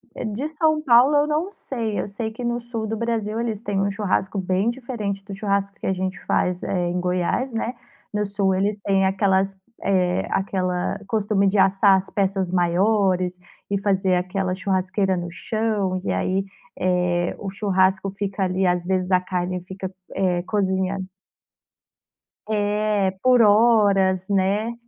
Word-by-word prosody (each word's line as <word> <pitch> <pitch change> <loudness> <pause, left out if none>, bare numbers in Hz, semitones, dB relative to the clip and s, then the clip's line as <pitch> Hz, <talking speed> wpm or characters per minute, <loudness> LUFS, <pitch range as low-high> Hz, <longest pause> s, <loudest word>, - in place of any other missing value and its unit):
Eh, - - -4
de 225 +7 -3
São 310 0 +1
Paulo 260 +1 +5
eu 290 0 +3
não 310 +6 -1
sei. 230 - -4
Eu - - -2
sei 220 +2 -4
que 240 +3 -8
no 240 0 -1
sul 230 -2 -4
do 225 - -3
Brasil 225 -1 -2
eles 225 -3 -2
têm 205 -3 -2
um 200 - 0
churrasco 200 -1 -1
bem 190 +3 +1
diferente 235 -6 -4
do 200 - -8
churrasco 200 0 -1
que - - -4
a 190 - +2
gente 185 0 -3
faz, 180 0 0
eh, 180 -2 -1
em 180 +1 -1
Goiás, 180 +8 0
né. 230 +2 -2 0.4
No 210 0 0
sul, 195 -1 0
eles 200 +2 0
têm 195 -1 +2
aquelas 195 0 +1 0.3
eh, 185 -2 +1
aquela 185 -2 -1
costume 205 -1 +1
de 200 +2 +1
assar 195 +1 +5
as 190 - -9
peças 195 -2 0
maiores, 185 0 +2 0.3
e 200 -1 0
fazer 190 -2 +1
aquela 185 +1 -1
churrasqueira 190 0 0
no 175 0 -4
chão. 205 -2 -1
E - - -1
aí, 190 +1 0 0.4
eh, 180 -1 +1
o 200 - -6
churrasco 190 -1 +1
fica 195 0 -4
ali, 185 +1 0
às 180 -1 +1
vezes, 185 0 0
a 185 - +4
carne 180 0 -2
fica, 190 0 -6 0.2
eh, 180 -2 +1
cozinhando 190 -2 -1 1.4
É, 210 -2 +1
por 255 -1 +5
horas, 205 -4 +4
né. 200 +4 +1
195 Hz, 160 wpm, -23 LUFS, 185-215 Hz, 1.4 s, Paulo